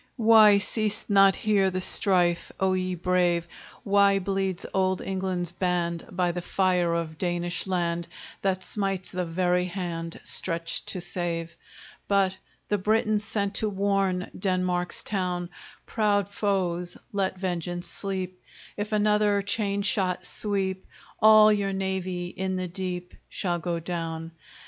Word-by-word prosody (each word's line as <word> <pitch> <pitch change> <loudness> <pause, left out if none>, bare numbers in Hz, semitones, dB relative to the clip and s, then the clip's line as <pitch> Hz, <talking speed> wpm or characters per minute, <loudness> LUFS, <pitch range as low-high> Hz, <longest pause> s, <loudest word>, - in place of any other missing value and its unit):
Why 220 -3 +7
ceased 210 +1 0
not 195 -1 +6
here 200 -3 +2
the 185 0 -2
strife, 180 -2 +2
O 190 -1 +2
ye 185 0 -1
brave? 175 -1 +1 0.4
Why 200 -1 +4
bleeds 195 -1 -1
old 190 -1 +1
England's 185 -2 -2
band, 175 -2 -1
By 180 -1 +1
the 175 +1 -4
fire 180 -2 +1
of 160 -2 -4
Danish 175 0 -2
land, 170 -2 -1 0.3
That 190 -1 0
smites 195 -3 -1
the 180 0 -2
very 180 +1 +1
hand 170 -2 -5
Stretched 165 -1 -2
to 185 - -4
save? 170 -1 -2 0.5
But 195 -2 +2 0.3
the 205 - 0
Britons 215 +1 +2
sent 200 -1 -1
to 215 - 0
warn 195 -2 0
Denmark's 185 -2 -1
town; 180 -3 -2 0.3
Proud 205 -3 +1
foes, 185 -4 -1 0.2
let 190 -1 -1
vengeance 175 -1 -3
sleep; 185 -2 -4 0.4
If 210 +1 -3
another 210 -1 +3
chain 200 -1 -1
shot 185 -3 0
sweep, 190 -2 -2 0.3
All 215 0 +7
your 200 -1 -1
navy 190 -2 -2
in 190 +1 -3
the 185 0 -2
deep 180 0 -5 0.2
Shall 175 -2 -2
go 170 0 -2
down! 165 -1 -4
185 Hz, 135 wpm, -26 LUFS, 175-200 Hz, 0.5 s, Why